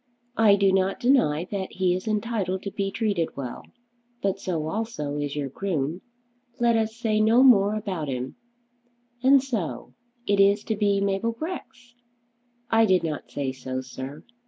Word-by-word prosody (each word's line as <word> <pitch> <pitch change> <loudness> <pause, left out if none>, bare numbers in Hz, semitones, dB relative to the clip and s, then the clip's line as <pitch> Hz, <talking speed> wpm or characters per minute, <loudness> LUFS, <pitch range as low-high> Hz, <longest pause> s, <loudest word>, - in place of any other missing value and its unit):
"I 210 -3 +7
do 200 -1 +3
not 190 0 +1
deny 240 - +3
that 195 -2 -4
he 185 -1 +1
is 185 +4 -4
entitled 210 -4 -1
to 200 - -4
be 195 0 -2
treated 195 -8 -1
well; 130 -3 -5 0.6
but 195 0 0
so 170 -5 -2
also 160 -7 -3
is 145 -1 -3
your 145 -2 -2
groom. 165 0 -2 0.6
Let 235 -1 +3
us 220 0 0
say 220 -2 0
no 225 +4 +5
more 210 -5 +6
about 190 -8 -3
him. 130 -1 -4 0.9
And 265 +1 +5
so 180 - -4 0.3
it 200 0 +1
is 200 +1 +4
to 220 - -2
be 200 -1 +1
Mabel 200 +3 0
Grex?" 250 -4 -7 0.8
"I 225 0 +5
did 185 -3 +3
not 155 -3 -4
say 140 -2 -2
so, 130 0 -5
sir. 130 +3 -8
195 Hz, 160 wpm, -25 LUFS, 155-220 Hz, 0.9 s, I